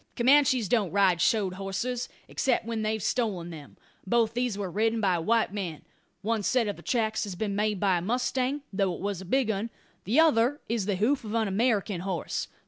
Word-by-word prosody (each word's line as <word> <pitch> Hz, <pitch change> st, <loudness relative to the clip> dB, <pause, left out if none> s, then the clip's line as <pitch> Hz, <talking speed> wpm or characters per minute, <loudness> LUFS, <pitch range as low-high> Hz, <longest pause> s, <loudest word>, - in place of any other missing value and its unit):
Comanches 260 Hz, -2 st, +4 dB
don't 210 Hz, -3 st, +1 dB
ride 185 Hz, -2 st, +3 dB
shod 200 Hz, -3 st, +2 dB
horses, 200 Hz, +6 st, -3 dB, 0.2 s
except 255 Hz, -4 st, 0 dB
when 230 Hz, -1 st, -3 dB
they've 215 Hz, -1 st, -1 dB
stolen 195 Hz, -8 st, -1 dB
them. 150 Hz, -3 st, -11 dB, 0.3 s
Both 230 Hz, +1 st, +2 dB
these 240 Hz, -3 st, -1 dB
were 195 Hz, -3 st, -4 dB
ridden 225 Hz, +4 st, +1 dB
by 185 Hz, -5 st, +2 dB
white 220 Hz, +4 st, +1 dB
men. 180 Hz, -7 st, -4 dB, 0.4 s
One 220 Hz, +1 st, 0 dB
set 235 Hz, +2 st, +1 dB
of 205 Hz, -, -2 dB
the -, -, -13 dB
tracks 220 Hz, -3 st, 0 dB
has 195 Hz, -3 st, -6 dB
been 200 Hz, +1 st, -2 dB
made 210 Hz, -1 st, 0 dB
by 190 Hz, -3 st, +2 dB
a -, -, -6 dB
mustang, 255 Hz, +6 st, -1 dB
though 190 Hz, -2 st, +1 dB
it -, -, -4 dB
it -, -, -10 dB
was 200 Hz, -2 st, -3 dB
a -, -, -9 dB
big 250 Hz, +3 st, +1 dB
'un. 215 Hz, +3 st, -3 dB, 0.4 s
The 235 Hz, +10 st, +2 dB
other 290 Hz, -3 st, +4 dB
is 225 Hz, -4 st, -1 dB
the 200 Hz, -, +1 dB
hoof 240 Hz, +8 st, +1 dB
of 215 Hz, 0 st, -4 dB
an 225 Hz, -2 st, +1 dB
American 205 Hz, -2 st, 0 dB
horse. 185 Hz, -3 st, -3 dB
215 Hz, 210 wpm, -28 LUFS, 195-235 Hz, 0.4 s, Comanches